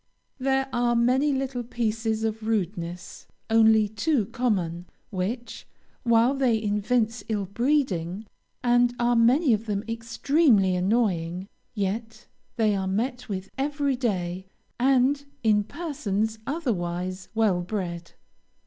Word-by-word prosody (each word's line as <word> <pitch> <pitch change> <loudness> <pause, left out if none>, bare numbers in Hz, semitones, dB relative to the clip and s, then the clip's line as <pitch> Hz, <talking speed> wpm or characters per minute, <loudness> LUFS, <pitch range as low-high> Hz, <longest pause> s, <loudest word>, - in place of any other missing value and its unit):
There 270 0 +1
are 240 0 +2
many 255 +5 +3
little 265 -2 -2
pieces 225 -2 -2
of 220 0 -2
rudeness, 180 -5 -3 0.2
only 220 -1 +5
too 220 +3 0
common, 190 -8 -1 0.2
which, 225 +5 -4 0.3
while 235 +1 +4
they 260 -5 +2
evince 220 +2 0
ill 210 -3 -1
breeding, 210 - 0 0.4
and 245 0 +3
are 240 0 +2
many 245 +4 +4
of 220 +1 -2
them 205 -1 -1
extremely 230 - +2
annoying, 185 -3 0 0.3
yet 220 +3 -3 0.3
they 215 -3 +2
are 190 -1 -2
met 245 +6 -2
with 190 -1 -5
every 285 -1 0
day, 190 -6 -2 0.3
and 270 +2 +3 0.2
in 210 -2 +4
persons 220 - -2
otherwise 185 - -3
well 210 -5 +2
bred. 175 -3 -5
225 Hz, 115 wpm, -26 LUFS, 195-245 Hz, 0.4 s, only